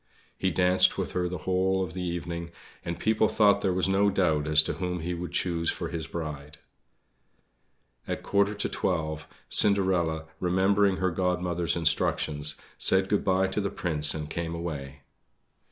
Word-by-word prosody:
He 95 - 0
danced 90 +1 +3
with - - -3
her 90 -1 -1
the 90 - -4
whole 95 +1 +1
of 85 -3 -6
the 90 - -5
evening, 85 -1 -4 0.3
and 85 0 -4
people 110 0 +2
thought 105 -2 +3
there 95 - +1
was 90 +1 +1
no 100 +1 +3
doubt 80 -7 +1
as 75 0 +6
to - - -3
whom 90 -2 -3
he 90 +2 -3
would 90 +1 -5
choose 85 -2 0
for - - -3
his 85 -2 -5
bride. 75 -3 -6 1.5
At - - -2
a - - -16
quarter 100 +1 +1
to 100 - -2
twelve, 80 -3 -2 0.2
Cinderella, 90 -6 +2
remembering 95 +2 +2
her 95 -1 0
Godmother's 90 -1 -1
instructions, 75 -2 +1 0.2
said 95 0 +4
good 105 - +1
bye 95 0 +2
to 105 - -1
the 100 - -1
Prince 75 -4 0
and 75 -1 -5
came 85 +1 -4
away. 75 -5 -6
90 Hz, 170 wpm, -27 LUFS, 80-95 Hz, 1.5 s, as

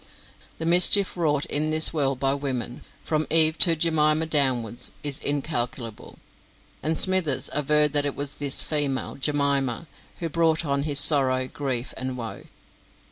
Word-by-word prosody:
The 160 - -6
mischief 180 +3 +4
wrought 150 -5 -1
in 150 +1 -1
this 155 +1 +3
world 135 -4 -2
by 135 0 0
women, 130 -4 -5 0.2
from 155 -1 -3
Eve 160 -1 +4
to 170 -3 +9
Jemima 155 -1 +1
downwards, 130 -7 -1
is 145 -2 -3
incalculable, 125 -6 -4 0.6
and 160 +1 -2
Smithers 185 -7 +1
averred 150 +1 +1
that 145 -1 +1
it 140 - -6
was 145 0 -6
this 140 -2 +4
female, 145 -4 -3
Jemima, 140 -2 -2 0.3
who 170 - -5
brought 165 0 -1
on 140 -1 -2
his 145 -1 +5
sorrow, 130 -4 +3
grief, 130 -3 -5
and 130 0 -6
woe. 115 -5 -9
145 Hz, 145 wpm, -23 LUFS, 135-155 Hz, 0.6 s, to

